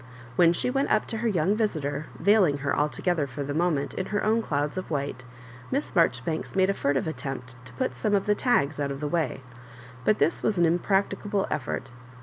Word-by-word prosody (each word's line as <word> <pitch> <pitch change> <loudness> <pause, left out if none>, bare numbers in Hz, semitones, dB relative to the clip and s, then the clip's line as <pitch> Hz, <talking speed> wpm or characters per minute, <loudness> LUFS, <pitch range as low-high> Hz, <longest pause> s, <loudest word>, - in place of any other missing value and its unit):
When 170 +4 +6
she 210 +8 0
went 275 +2 0
up 215 - +2
to 225 - -3
her 235 +2 -1
young 190 -1 +2
visitor, 155 -9 -1
veiling 185 -5 +4
her 140 - +1
altogether, 150 +1 0
for 140 +2 -5
the 145 +1 -3
moment, 155 -3 0
in 190 - -3
her 205 -1 -1
own 220 +2 +3
clouds 145 -6 -1
of 185 - -5
white. 140 -4 -2 0.5
Miss 275 -3 -2
Marjoribanks 160 -1 +1
made 190 0 +4
a - - -1
furtive 140 -7 0
attempt 130 -4 -5
to 125 - -12
put 130 - -1
some 205 +12 0
of 195 - +1
the 210 - +3
tags 200 - +1
out 140 -1 0
of 135 0 -4
the 150 - -2
way; 155 -5 -1 0.6
but 215 - +3
this 165 - +1
was 215 -3 0
an 170 - +4
im 170 +2 +2
practicable 200 +1 0
effort. 135 -2 -3
165 Hz, 210 wpm, -26 LUFS, 140-200 Hz, 0.6 s, When